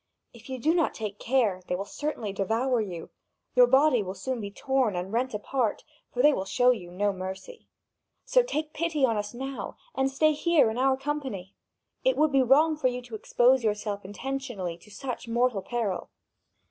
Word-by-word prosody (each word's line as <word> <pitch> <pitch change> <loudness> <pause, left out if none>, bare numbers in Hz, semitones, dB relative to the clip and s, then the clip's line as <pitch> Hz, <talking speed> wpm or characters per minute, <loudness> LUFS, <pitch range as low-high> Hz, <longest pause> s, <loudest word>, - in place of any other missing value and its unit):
If 235 +1 -14
you 260 - -3
do 305 +7 +2
not 335 -4 +1
take 210 -2 -5
care, 225 -7 +1
they 180 - 0
will 195 +2 -4
certainly 235 -5 -4
devour 225 +5 +1
you. 180 -6 -6 0.4
Your 250 -1 +7
body 265 -1 +4
will 190 -1 -5
soon 245 +5 -3
be 200 - -4
torn 255 -1 0
and 180 +3 -4
rent 245 0 0
apart, 225 +1 -1 0.3
for 250 - 0
they 295 0 +7
will 190 - -1
show 245 +6 +3
you 190 -8 -4
no 200 +3 0
mercy. 190 - -7 0.6
So - - +5
take 310 -11 -3
pity 315 -4 +1
on 230 -3 +1
us 205 +2 -3
now, 270 +2 -5 0.2
and 265 0 +1
stay 310 +3 +3
here 305 -6 +3
in 230 - -4
our 265 0 +3
company! 270 -10 -4 0.5
It - - +2
would 305 -1 +3
be 270 -1 +4
wrong 300 +5 +4
for 285 -4 +2
you 250 0 -3
to 240 -2 -14
expose 245 +4 +3
yourself 210 -1 -1
intentionally 215 -3 -4
to 190 - -18
such 250 +3 -6
mortal 235 -2 +1
peril." 220 -4 -3
245 Hz, 190 wpm, -27 LUFS, 205-270 Hz, 0.6 s, Your